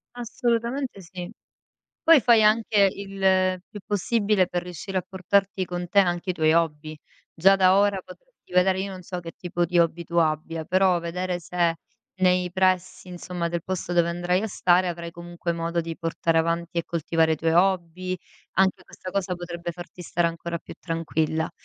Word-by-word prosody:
Assolutamente, 240 0 -2
sì. 180 +2 -8 0.7
Poi 325 -4 +7
fai 230 -3 +5
anche 215 -2 +4
il 190 -2 +1
più 205 - -10
possibile 205 -2 +1
per 175 -1 -3
riuscire 180 +2 -4
a - - -2
portarti 190 +1 0
con 175 0 -5
te 200 +1 +5
anche 175 0 0
i - - +1
tuoi 155 -1 +3
hobby. 155 -2 0 0.4
Già 195 +4 +5
da 190 0 +5
ora 200 -1 +3
potresti - - -17
vedere 185 +1 +3
io 195 0 -3
non 185 -1 -8
so 180 0 -5
che 165 -1 -8
tipo 175 -1 -2
di 175 +1 0
hobby 170 0 +2
tu 170 +1 -6
abbia, 160 0 0
però 185 -1 +3
vedere 175 +1 -3
se 170 0 0 0.4
nei 180 -1 +2
pressi 185 -1 0
insomma 175 -1 -4
del 170 -1 -3
posto 185 -1 -3
dove 170 -1 +3
andrai 175 +3 0
a - - -1
stare, 180 -2 +2
avrai 170 -1 -4
comunque 170 0 -5
modo 170 0 -1
di 165 0 -6
portare 165 -1 -1
avanti 170 +1 -1
e 170 - -1
coltivare 160 -1 +1
i - - 0
tuoi 165 +1 0
hobby, 185 0 +1 0.4
anche 190 -1 +1
questa 185 - -9
cosa 185 -2 -1
potrebbe 175 -1 -6
farti 175 +1 -11
stare 170 0 +1
ancora 170 0 -5
più - - -11
tranquilla. 160 -1 -1
180 Hz, 175 wpm, -25 LUFS, 170-190 Hz, 0.7 s, Poi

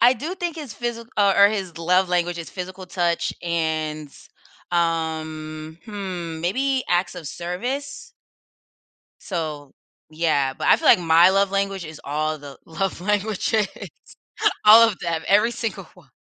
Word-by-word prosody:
I 245 +2 +6
do 315 +9 -4
think 350 -3 -4
his 295 -7 -7
physi 235 +1 -4
or 200 -1 +4
or - - +8
his 190 -6 -4
love 180 +3 +2
language 175 -1 0
is 165 - -6
physical 185 0 -7
touch 175 -2 0
and, 155 -3 -2 0.6
um, 160 -2 -2
hmm, 185 -6 -5
maybe 260 +9 0
acts 175 +1 +1
of 170 -5 -7
service. 260 - -5 1.1
So, 155 -6 -5 0.4
yeah, 155 -4 +1
but - - -3
I - - +7
feel - - 0
like - - +8
my 170 +1 +5
love 195 0 +2
language 195 -2 -1
is 155 -1 -10
all 155 +2 -2
the 140 -2 -11
love 185 +2 -3
languages. 210 +2 0 1.0
All 225 +2 +9
of 210 -5 -3
them, 165 -2 -2
every 210 +4 +4
single 230 -2 -4
one, - - -20
180 Hz, 150 wpm, -23 LUFS, 160-210 Hz, 1.1 s, All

